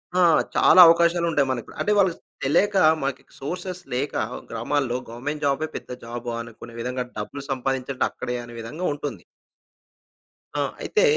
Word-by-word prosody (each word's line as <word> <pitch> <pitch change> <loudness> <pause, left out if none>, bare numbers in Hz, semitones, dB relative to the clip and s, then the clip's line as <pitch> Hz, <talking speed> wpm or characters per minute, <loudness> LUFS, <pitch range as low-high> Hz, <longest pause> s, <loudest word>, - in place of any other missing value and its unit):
ఆ! - - +3 0.4
చాలా 185 - +6
అవకాశాలుంటాయి 170 -3 +3
మనకు. 120 -3 -4
అంటే 210 - +1
వాళ్ళకి 190 -4 +3 0.3
తెలియక 195 +9 +3 0.2
మనకి 135 0 -2 0.2
సోర్సెస్ 180 +5 -5
లేక, 135 +4 -1 0.4
గ్రామాల్లో 125 +2 0
గవర్నమెంట్ 145 +6 -5
జాబే 140 +3 +1
పెద్ద - - -7
జాబా, 120 +1 -5
అనుకునే 115 0 -11
విధంగా 125 +1 -2
డబ్బులు 135 +7 -5
సంపాదించడం 130 0 -1
అక్కడే 125 - -4
అనే 120 0 -11
విధంగా 150 +11 -5
ఉంటుంది. 145 0 -6 1.3
ఆ! - - +1 0.2
అయితే, 435 +3 +1
135 Hz, 135 wpm, -24 LUFS, 120-165 Hz, 1.3 s, చాలా